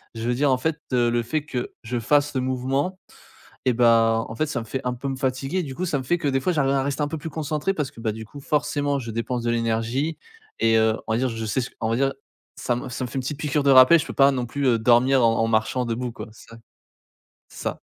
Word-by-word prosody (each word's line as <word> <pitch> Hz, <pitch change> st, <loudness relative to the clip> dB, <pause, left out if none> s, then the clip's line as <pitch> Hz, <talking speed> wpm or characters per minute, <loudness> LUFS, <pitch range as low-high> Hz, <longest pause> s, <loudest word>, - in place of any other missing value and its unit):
je 115 Hz, -, -5 dB
veux 120 Hz, -, +2 dB
dire 140 Hz, +2 st, +2 dB
en 130 Hz, -, +3 dB
fait, 155 Hz, +4 st, -1 dB, 0.2 s
heu, 120 Hz, -1 st, +3 dB
le 120 Hz, 0 st, 0 dB
fait 150 Hz, +6 st, -2 dB
que 125 Hz, -6 st, -4 dB
je 120 Hz, +1 st, -3 dB
fasse 145 Hz, +4 st, +2 dB
le 130 Hz, -, +1 dB
mouvement 135 Hz, +8 st, -1 dB, 0.7 s
et 125 Hz, -, +3 dB
ben, 115 Hz, -1 st, +4 dB
en -, -, -7 dB
fait 155 Hz, +5 st, 0 dB
ça 135 Hz, -, -2 dB
me -, -, -9 dB
fait 130 Hz, +4 st, -4 dB
un 125 Hz, -, 0 dB
peu 130 Hz, +3 st, -6 dB
me 135 Hz, -, -2 dB
fatiguer 135 Hz, +7 st, -1 dB
du 135 Hz, -4 st, -6 dB
coup 185 Hz, -, -2 dB
ça 150 Hz, -5 st, 0 dB
me -, -, -5 dB
fait 175 Hz, +7 st, +1 dB
que 165 Hz, -, -2 dB
des 135 Hz, -, +1 dB
fois 180 Hz, -, +1 dB
j'arrive 140 Hz, -4 st, +1 dB
à 135 Hz, -, +2 dB
rester 140 Hz, +2 st, -1 dB
un -, -, 0 dB
peu 160 Hz, -, -4 dB
plus 160 Hz, +1 st, -6 dB
concentré 155 Hz, +5 st, -2 dB
parce 150 Hz, -6 st, -2 dB
que 115 Hz, -, -13 dB
bah, 110 Hz, -2 st, 0 dB
du 110 Hz, +1 st, -8 dB
coup, 145 Hz, +7 st, -11 dB
forcément 145 Hz, -1 st, 0 dB
je 115 Hz, -3 st, -6 dB
dépense 115 Hz, +2 st, -3 dB
de 120 Hz, -, 0 dB
l'énergie 115 Hz, +7 st, -1 dB, 0.4 s
et, 115 Hz, 0 st, +3 dB
heu, 110 Hz, 0 st, +3 dB
on -, -, -2 dB
va 115 Hz, -, +1 dB
dire 130 Hz, 0 st, +1 dB
je 115 Hz, -1 st, -4 dB
sais 110 Hz, +5 st, 0 dB
ce 120 Hz, -, -5 dB
on 110 Hz, -, 0 dB
va -, -, +2 dB
dire, 135 Hz, 0 st, +1 dB, 0.4 s
ça 120 Hz, -, -1 dB
me 125 Hz, +2 st, -5 dB
ça 125 Hz, -, -4 dB
me -, -, -7 dB
fait -, -, -10 dB
une 135 Hz, -, 0 dB
petite 140 Hz, +3 st, -5 dB
piqûre 150 Hz, -1 st, 0 dB
de 140 Hz, -, +3 dB
rappel 130 Hz, +6 st, +8 dB
je -, -, -3 dB
peux -, -, -6 dB
pas 140 Hz, 0 st, +5 dB
non 125 Hz, -2 st, -2 dB
plus, 140 Hz, +3 st, -3 dB
heu, 115 Hz, -2 st, +3 dB
dormir 125 Hz, +3 st, +4 dB
en 115 Hz, 0 st, +3 dB
en 115 Hz, -, +2 dB
marchant 115 Hz, +3 st, +1 dB
debout 120 Hz, +1 st, -3 dB
quoi, -, -, -8 dB
c'est 110 Hz, -, -17 dB
ça. 115 Hz, -, -11 dB, 0.9 s
C'est -, -, -10 dB
ça. -, -, -3 dB
130 Hz, 290 wpm, -24 LUFS, 115-145 Hz, 0.9 s, rappel